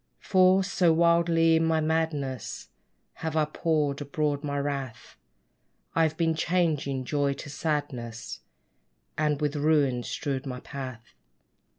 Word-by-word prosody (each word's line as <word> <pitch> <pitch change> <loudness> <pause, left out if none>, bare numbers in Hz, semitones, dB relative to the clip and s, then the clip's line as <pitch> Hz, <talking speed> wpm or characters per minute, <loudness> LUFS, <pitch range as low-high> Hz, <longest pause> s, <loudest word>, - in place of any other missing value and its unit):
For, 185 0 +4
so 185 -2 +2
wildly 170 0 +4
in 160 - +1
my 160 -1 +2
madness 155 -6 -2 0.5
Have 160 -1 -3
I 155 - +3
poured 150 -2 0
abroad 145 0 -1
my 145 -1 -2
wrath, 140 -4 -4 0.8
I've 160 -1 +2
been 165 -1 +2
changing 155 -6 0
joy 140 0 +1
to 140 +1 -9
sadness; 130 -8 -3 0.8
And 150 -2 0
with 150 -1 -1
ruins 145 -5 +2
strewed 135 -2 -3
my 125 -1 -5
path. 130 -4 -8
150 Hz, 120 wpm, -27 LUFS, 140-160 Hz, 0.8 s, For